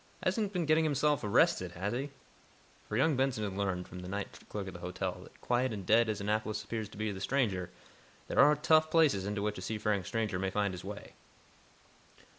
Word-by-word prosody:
Hasn't 215 -4 0
been 180 -4 -1
getting 155 +1 +4
himself 150 -1 +1
arrested, 95 -3 +3
has 95 +5 -2
he?" 135 +4 -2 0.8
For 105 - -1
young 150 +3 +3
Benson 130 -4 0
had 100 -2 -3
learned, 95 -2 -2
from 90 - -9
the 90 - -7
night 100 +2 -5
clerk 105 -2 -4
at 95 - -6
the 90 - -9
hotel, 90 +1 -4
that, - - -16
quiet 125 +1 +1
and 100 -4 -5
"dead" 110 +3 +4
as 105 -2 -1
Annapolis 110 +1 -1
appears 110 -3 -4
to 105 - -13 0.2
the 95 - -7
stranger, 100 -7 0 0.6
there - - -1
are 150 +2 +7
"tough" 155 +1 +4
places 145 - +3
into 100 0 -2
which 105 -2 -2
a - - -7
seafaring 105 0 -1
stranger 105 -1 -2
may 95 0 0
find 100 0 0
his 90 - -7
way. 100 +2 -8
105 Hz, 205 wpm, -32 LUFS, 95-135 Hz, 0.8 s, are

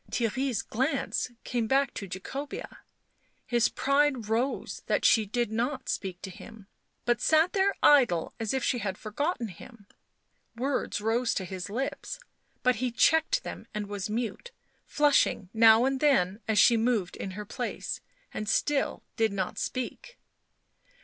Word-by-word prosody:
Theirry's 240 0 -1
glance 260 +2 -1
came 235 -2 -1
back 275 +2 +2
to 200 - -6
Jacobea; 270 +10 -6 0.7
his 240 -2 +2
pride 275 -5 +1
rose 240 +5 -1
that - - +1
she 220 -2 +5
did 240 +1 -1
not 250 +4 -2
speak 185 -2 -3
to 190 - -5
him, 220 +2 -12 0.4
but 240 -1 +1
sat 320 +3 +4
there 395 0 +2
idle 245 - +5
as 225 -2 -1
if 265 -1 -1
she 245 - +1
had 195 -4 -3
forgotten 245 - -2
him; 205 +4 -13 0.7
words 255 -3 -1
rose 230 +3 +1
to 190 - -2
his 185 +1 -6
lips, 270 - -4 0.4
but 250 -2 +3
he 250 +2 0
checked 320 - +3
them - - -7
and 210 -1 -2
was 200 -1 -4
mute, 230 - -3 0.4
flushing 285 -9 +2
now 225 +1 +6
and 270 0 0
then 210 -10 +3
as 220 -1 +1
she 235 +1 +6
moved 225 -6 0
in 195 - -5
her 210 - -5
place - - -4 0.3
and 215 -1 -3
still 285 +5 +1
did 225 -2 +2
not 190 -2 -3
speak. 255 - -4
235 Hz, 150 wpm, -28 LUFS, 210-270 Hz, 0.7 s, now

